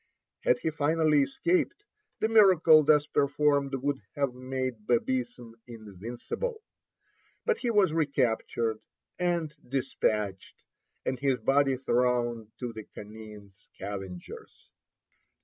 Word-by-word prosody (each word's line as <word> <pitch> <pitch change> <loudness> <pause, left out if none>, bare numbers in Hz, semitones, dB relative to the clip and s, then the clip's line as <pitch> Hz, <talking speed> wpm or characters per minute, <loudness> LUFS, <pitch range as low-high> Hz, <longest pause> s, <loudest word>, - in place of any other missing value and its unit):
Had 125 - +2
he 160 - -2
finally 155 0 +2
escaped, 170 - 0 0.4
the 220 - +3
miracle 185 -8 +6
thus 150 0 +4
performed 145 -1 +1
would 135 +1 -1 0.2
have 140 -3 0
made 130 -3 -4
Babism 120 -1 -1
invincible. 120 - -6 0.8
But 470 - +1
he 245 - -1
was 205 -7 +3
recaptured 120 -7 0 0.4
and 170 -4 0 0.2
despatched, 110 -7 -2 0.4
and 130 - -2
his 135 -2 +1
body 135 0 +2
thrown 120 -3 0
to 120 -2 -5
the 110 -1 -8
canine 105 -1 -11
scavengers. 95 -1 -9
130 Hz, 105 wpm, -28 LUFS, 115-150 Hz, 0.8 s, miracle